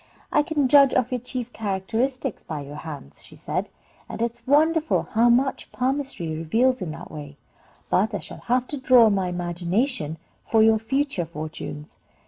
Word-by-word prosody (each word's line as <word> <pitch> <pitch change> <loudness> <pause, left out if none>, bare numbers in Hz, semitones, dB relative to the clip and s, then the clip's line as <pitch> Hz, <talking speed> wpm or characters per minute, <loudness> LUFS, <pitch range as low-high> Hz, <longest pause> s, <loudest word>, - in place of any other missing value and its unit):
"I 300 - +4
can 295 -2 0
judge 275 0 +6
of 250 0 +1
your 250 - -1
chief 245 0 -6
characteristics 225 +6 -2
by 155 -3 -5
your 145 +1 -8
hands," 150 - -9
she - - -15
said, - - -3 0.4
"and - - -6
it 235 0 +1
is 235 0 -23
wonderful 315 +3 +3
how 230 +2 +4
much 260 +3 +1
palmistry 265 - -2
reveals 225 +11 +1
in 180 - -3
that 165 +3 -8
way; 145 -2 -9 0.5
but 210 +3 +2
I - - -2
shall 170 -2 -10
have 250 +1 +2
to 290 -3 -4
draw 255 -3 +7
on 215 - +4
my 190 -2 0
imagination 175 - -2 0.3
for 220 -1 +4
your 220 0 +5
future 260 - -1
fortunes." 155 -1 -7
225 Hz, 175 wpm, -24 LUFS, 175-260 Hz, 0.5 s, draw